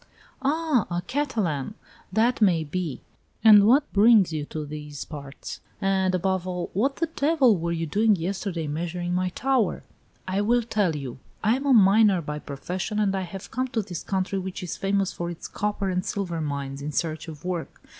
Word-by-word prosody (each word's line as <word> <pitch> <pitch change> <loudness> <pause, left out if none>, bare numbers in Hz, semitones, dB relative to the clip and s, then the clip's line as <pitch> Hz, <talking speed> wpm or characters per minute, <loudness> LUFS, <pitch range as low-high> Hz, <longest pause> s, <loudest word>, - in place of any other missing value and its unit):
"Ah, 290 - +1
a 175 0 -2
Catalan! 210 - -2 0.4
That 230 +5 +2
may 175 -6 +4
be. 160 -2 -4 0.4
And 210 -2 +8
what 280 +5 +4
brings 205 -4 +6
you 150 -2 -2
to 155 0 -5
these 150 -1 -7
parts? 140 -3 -8 0.2
And, 190 -1 +1
above 185 0 0
all, 180 -1 -3
what 270 +8 +1
the 330 - 0
devil 295 -6 +3
were 170 -1 -2
you 165 -1 -1
doing 210 +7 +3
yesterday 175 -1 -3
measuring 175 +4 -3
my 180 0 +1
tower?" 255 +1 0 0.4
"I 190 +2 0
will 240 +3 +2
tell 205 -7 0
you. 130 -4 -6 0.2
I 220 +2 +4
am 275 +2 -3
a 270 - +5
miner 205 -2 +6
by 150 -2 -5
profession, 180 +9 -4
and 200 -2 +2
I 190 - -1
have 185 +1 -8
come 255 +2 -1
to 230 -4 -2
this 175 -4 -6
country, 195 0 -1
which 190 0 -5
is 175 - -4
famous 195 0 0
for 170 0 -4
its 170 - -7
copper 205 -2 -2
and 180 0 0
silver 175 -5 -3
mines, 140 -2 -4
in 150 +2 -4
search 155 +1 -2
of 160 +1 -9
work. 180 -3 -4
185 Hz, 185 wpm, -25 LUFS, 165-215 Hz, 0.4 s, And